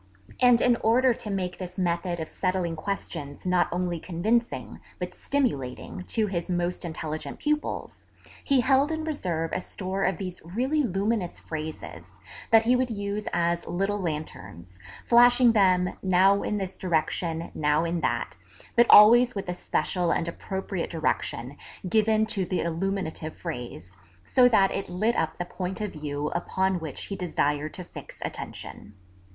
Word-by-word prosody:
And 245 -2 +5
in 245 -1 +4
order 245 +3 +3
to 225 -1 -7
make 185 -3 -3
this 180 -1 -7
method 175 -1 -1
of 160 - -4
settling 185 -3 -1
questions 155 -5 -5
not 180 -1 +3
only 175 -1 -1
convincing, 220 +9 -1 0.2
but - - -5
stimulating, 185 - -2
to 220 -2 +1
his 180 -4 -3
most 175 0 -1
intelligent 160 -2 -5
pupils, 300 0 -3 0.4
he 275 -3 +3
held 270 +4 +3
in 315 0 -2
reserve 175 - -2
a - - 0
store 190 +1 -4
of 190 - 0
these 185 -2 -6
really 255 - 0
luminous 200 -4 -1
phrases, 155 - -7 0.4
that 225 0 +6
he 245 +3 +3
would 255 0 +1
use 205 -1 -3
as 170 0 0
little 195 +3 -1
Lanterns, 120 - -6 0.3
flashing 245 0 +6
them, 185 -4 +3
now 190 +2 +4
in 210 - -1
this 190 -2 -5
direction, 165 -1 -1
now 150 +2 +1
in 170 0 -1
that, - - -1 0.4
but 235 0 +6
always 240 +4 +8
with 195 -1 -4
a 180 - -1
special 180 0 0
and 170 - 0
appropriate 190 +1 -4
direction 145 -5 -2 0.3
given 220 +2 +3
to 210 -3 0
the 180 +1 -1
illuminative 170 -2 -3
phrase, 120 - -7 0.3
so 250 - +5
that 195 -4 +4
it 195 - -3
lit 210 +7 0
up 160 -1 -1
the 175 - -3
point 185 +2 -5
of 210 -2 -3
view 150 -1 -3
upon 190 +1 0
which 155 -5 -6
he 200 - -5
desired 155 -4 -1
to 180 - -6
fix - - -11
attention. 105 - -8
185 Hz, 155 wpm, -26 LUFS, 165-215 Hz, 0.4 s, always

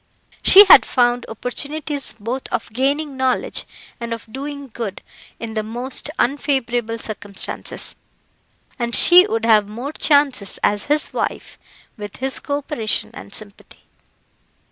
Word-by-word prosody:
She 400 +2 +9
had - - +9
found 245 -1 0
opportunities 285 +4 -4
both 230 +5 -5
of - - -4
gaining 280 +3 -1
knowledge 260 -1 -1 0.3
and 235 -1 -4
of 230 - -12
doing 280 0 -7
good 215 -5 -6 0.4
in 225 -1 -6
the 215 - -1
most 245 +6 -3
unfavourable 245 -4 -1
circumstances, 205 -3 -3 0.8
and 235 -1 0
she 360 +2 +7
would 225 - -2
have 215 -3 +4
more 245 +7 -6
chances 285 -10 +2
as 205 0 +1
his 300 +1 +1
wife, - - -4 0.4
with 205 -2 -8
his 265 +1 -2
co 285 0 -3
operation 280 -7 -2
and - - -11
sympathy. 205 0 -11
245 Hz, 130 wpm, -19 LUFS, 220-285 Hz, 0.8 s, She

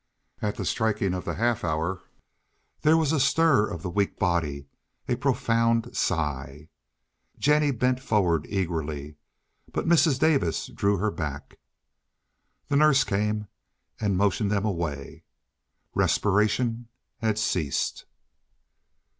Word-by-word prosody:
At 105 -1 -1
the - - -4
striking 105 -4 0
of 90 - -4
the - - -3
half 120 0 0
hour 85 +2 -1 0.8
there 155 +2 +5
was 155 -3 +1
a 160 - +1
stir 135 -4 +3
of 85 -2 -6
the - - -3
weak 100 +2 0
body—a 75 -7 -3
profound 115 -3 +1
sigh. 75 -2 -2 0.7
Jennie 150 0 +3
bent 125 0 +1
forward 95 - +1
eagerly, 80 -6 -3 0.5
but - - -2
Mrs. 165 -4 +4
Davis 140 - +1
drew 100 0 0
her 105 +3 0
back. 75 -6 -6 1.1
The 140 - +1
nurse 145 -2 +5
came 105 0 -1 0.5
and 100 -4 0
motioned 100 +1 +1
them 100 0 0
away. 85 -8 -4 0.7
Respiration 115 +4 +1 0.3
had 110 -2 0
ceased. 90 -9 -1
105 Hz, 115 wpm, -26 LUFS, 85-125 Hz, 1.1 s, there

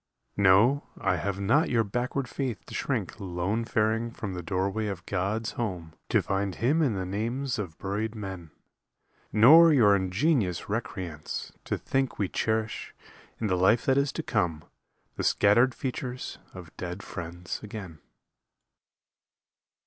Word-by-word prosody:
No, 100 +8 +5
I 90 -2 +1
have 100 +4 -2
not 140 - +3
your 115 -2 +3
backward 125 +5 -2
faith 120 -4 -4
to - - -11
shrink - - -2
Lone 95 +4 -2
faring 110 +1 +1
from 105 -4 -6
the 90 - -4
doorway 100 +4 -1
of 95 -3 -5
God's 100 +4 -1
home 90 -9 -4 0.2
To - - +3
find 95 -1 -1
Him 145 +8 +2
in 130 -9 +2
the 95 -1 -2
names 120 +7 -2
of 90 -6 -5
buried 105 +3 -3
men; 95 -6 -6 0.8
Nor 160 +10 +8
your 110 -9 +6
ingenious 95 - +1
recreance 95 -8 -4
to - - -1
think 135 -1 -1
We 100 -3 0
cherish, 110 0 -2 0.4
in 115 - -2
the 95 -3 +2
life 95 +6 +3
that 135 +1 +4
is 140 0 +1
to 160 - -3
come, 90 - 0 0.5
The - - -2
scattered 120 +5 +4
features 130 -2 -5
of 90 -3 -11
dead 90 +2 -5
friends 85 0 -6
again. 100 -7 -8
105 Hz, 145 wpm, -28 LUFS, 95-120 Hz, 0.8 s, Nor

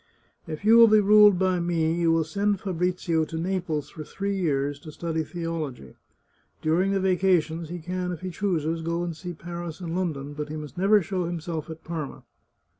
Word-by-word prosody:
If 155 +6 -6
you 225 +2 +7
will 230 0 +9
be 215 0 +6
ruled 210 -1 +7
by 185 -1 +1
me, 165 -2 +1
you 170 -1 +2
will 165 0 +3
send 200 +5 0
Fabrizio 180 -3 0
to 160 +1 -6
Naples 170 -4 -2
for 155 - -7
three 200 +6 -3
years 145 -6 0
to 155 - -10
study 160 0 -2
theology. 155 - -5 0.7
Dur 160 +3 +2
ing 195 +1 +1
the 195 - +1
vacations 175 -4 +1
he 175 - -5
can, 180 +2 -3
if 175 - -6
he 185 0 -4
chooses, 165 -4 -1
go 170 +1 -1
and 170 -2 -4
see 175 +2 -7
Paris 170 0 -7
and 170 -2 -4
London, 150 -6 -2
but 150 0 -5
he 155 - -5
must 150 -3 -8
never 200 +2 +4
show 185 +1 -2
himself 165 -2 -4
at 160 0 -9
Parma." 160 -4 -5
170 Hz, 195 wpm, -26 LUFS, 160-185 Hz, 0.7 s, will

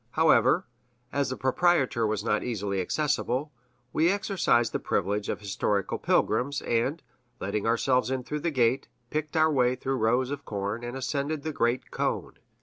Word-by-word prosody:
However, - - +4 0.5
as 140 -1 +1
the 130 - -4
proprietor 130 -4 +2
was 105 -1 -1
not - - +1
easily 100 -5 -2
accessible, 145 - -1 0.4
we 160 +3 +3
exercised 190 - +2
the - - 0
privilege 100 +1 -1
of - - -3
historical 100 0 -1
pilgrims, 140 +3 +1
and, 125 +8 0 0.4
letting 100 +2 -2
ourselves 125 +1 +2
in 130 -1 -2
through 150 +4 -4
the 170 - -1
gate, 130 -3 +1 0.2
picked 155 +1 -2
our 155 0 +4
way 125 -2 +3
through 135 +1 -2
rows 125 +3 +1
of 145 -1 -4
corn, 100 +3 -3
and 120 +2 -5
ascended 140 +3 -2
the 155 - -3
great 120 0 0
cone. - - -2
130 Hz, 160 wpm, -27 LUFS, 115-145 Hz, 0.5 s, However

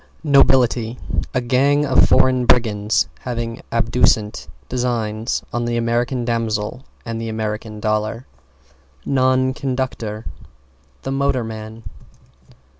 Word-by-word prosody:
=NOBILITY= 125 -5 +3 0.4
A 125 - +2
gang 140 +4 +2
of 130 -2 +4
foreign 130 -1 +4
brigands 105 -5 +3
having 115 -2 -4
abducent 115 -5 +1 0.2
designs 115 -2 -1
on 120 0 -1
the 120 0 -1
American 120 +2 0
Damsel 115 +1 -2 0.2
and 115 0 -4
the 115 - -4
American 110 0 -4
Dollar. 110 +3 -1 0.8
=NON 130 -1 +2
CONDUCTOR= 125 -5 -3 0.8
The 135 - -3
motorman. 115 -5 -2
115 Hz, 100 wpm, -20 LUFS, 110-130 Hz, 0.8 s, of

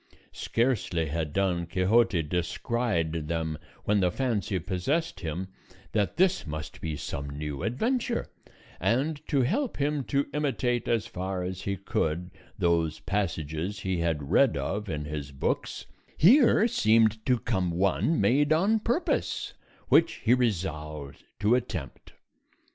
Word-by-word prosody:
Scarcely 115 -9 0
had 80 -1 -2
Don 90 -1 0
Quixote 95 +1 +3
descried 85 0 -1
them 80 -2 -2 0.2
when 105 0 +2
the 90 -2 +3
fancy 105 -3 -1
possessed 95 - -1
him 90 +1 -4 0.4
that 105 +5 0
this 185 - +2
must 75 0 -6
be 80 -2 -3
some 70 -1 -5
new 70 -1 -5
adventure; 235 - 0 0.5
and 145 +6 0
to 140 -4 +2
help 245 - 0
him 145 0 0
to 140 0 +1
imitate 130 -4 0
as 115 -3 +1
far 95 0 -4
as 90 +1 -4
he 100 0 -2
could 90 -4 -2 0.3
those 85 -2 +1
passages 95 -1 -2
he 95 -2 -1
had 80 -3 -1
read 135 +4 +4
of 105 +1 -3
in 75 -2 -3
his 75 -2 -5
books, 70 - -2 0.3
here 230 - +6
seemed 110 - +3
to 125 -1 +4
come 100 -6 -1
one 95 - +1
made 145 +4 +3
on 195 +8 +3
purpose, 240 +11 -1 0.4
which 165 - +5
he 115 - +5
resolved 80 - -2 0.2
to 105 +3 +3
attempt. 95 - -3
100 Hz, 135 wpm, -28 LUFS, 80-125 Hz, 0.5 s, here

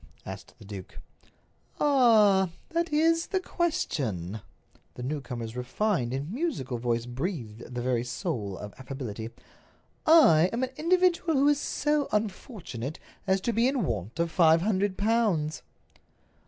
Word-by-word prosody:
asked 95 0 -9
the 110 - -14
duke. 95 -2 -9 0.8
"Ah—that 235 - +3
is 330 +2 +3
the 380 - 0
question!" 110 - -2 0.5
The 125 - -7
newcomer's 125 -5 -4
refined 130 - -1
and 140 +8 -4
musical 235 - -2
voice 120 -1 -1
breathed 125 - -5
the 120 - -2
very 125 -2 +1
soul 105 -4 -3
of 105 0 -8
affability. 125 -5 -6 0.8
"I 185 - +7
am 235 +3 -1
an 260 - -2
individual 345 0 +2
who 275 +1 +4
is 290 -1 +3
so 295 -1 0
unfortunate 190 - -3 0.3
as 190 0 +3
to 235 - -1
be 230 +3 +3
in 265 -4 0
want 110 - -4
of 170 -1 0
five 165 -2 +5
hundred 195 -1 0
pounds." 200 -8 +1
170 Hz, 130 wpm, -28 LUFS, -, 0.8 s, I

